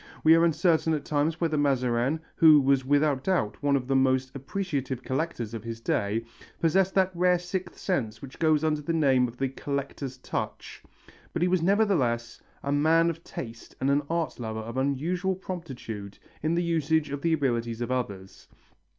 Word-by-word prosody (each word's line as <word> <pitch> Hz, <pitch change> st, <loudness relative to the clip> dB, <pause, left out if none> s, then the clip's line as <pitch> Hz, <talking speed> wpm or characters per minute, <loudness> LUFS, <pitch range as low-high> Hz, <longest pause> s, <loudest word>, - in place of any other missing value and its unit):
We 160 Hz, -, +7 dB
are 165 Hz, 0 st, +5 dB
uncertain 165 Hz, -1 st, +2 dB
at 150 Hz, -, -5 dB
times 155 Hz, +3 st, 0 dB
whether 155 Hz, -3 st, +1 dB
Mazarin, 130 Hz, +1 st, +1 dB, 0.2 s
who 155 Hz, -2 st, +8 dB
was 135 Hz, -1 st, +3 dB
without 145 Hz, 0 st, +2 dB
doubt 175 Hz, -, 0 dB
one 145 Hz, -1 st, +2 dB
of 130 Hz, -2 st, -1 dB
the 135 Hz, +1 st, 0 dB
most 130 Hz, 0 st, +2 dB
appreciative 140 Hz, -4 st, -3 dB
collectors 130 Hz, -5 st, -3 dB
of 110 Hz, -2 st, -5 dB
his 115 Hz, 0 st, -6 dB
day, 110 Hz, 0 st, -1 dB, 0.3 s
possessed 190 Hz, +3 st, +2 dB
that 190 Hz, -1 st, +3 dB
rare 180 Hz, +1 st, +3 dB
sixth 180 Hz, +1 st, -5 dB
sense 125 Hz, -, -2 dB
that 135 Hz, +3 st, -11 dB
goes 155 Hz, -2 st, +3 dB
under 155 Hz, -1 st, +1 dB
the 165 Hz, +3 st, -2 dB
name 135 Hz, -6 st, +3 dB
of 120 Hz, +1 st, -11 dB
the 135 Hz, -, 0 dB
collector's 140 Hz, -1 st, -4 dB
touch, -, -, -5 dB, 0.5 s
but 170 Hz, -, 0 dB
he -, -, +3 dB
was 180 Hz, -1 st, +2 dB
nevertheless 165 Hz, -, +1 dB, 0.2 s
a 140 Hz, -, -2 dB
man 160 Hz, +3 st, +4 dB
of 165 Hz, +1 st, -11 dB
taste 115 Hz, -1 st, -8 dB
and 135 Hz, +1 st, +1 dB
an 140 Hz, +1 st, +3 dB
art 165 Hz, -4 st, -2 dB
lover 110 Hz, -2 st, -4 dB
of 115 Hz, +2 st, -7 dB
unusual 165 Hz, +8 st, 0 dB
promptitude 130 Hz, -, -7 dB, 0.2 s
in 160 Hz, +2 st, +1 dB
the 175 Hz, -, +1 dB
use 165 Hz, -3 st, -1 dB, 0.2 s
of 140 Hz, 0 st, -4 dB
the 165 Hz, +1 st, +2 dB
ability 120 Hz, -6 st, 0 dB
of 120 Hz, +2 st, -4 dB
others. 100 Hz, -7 st, -4 dB
145 Hz, 180 wpm, -27 LUFS, 125-165 Hz, 0.5 s, who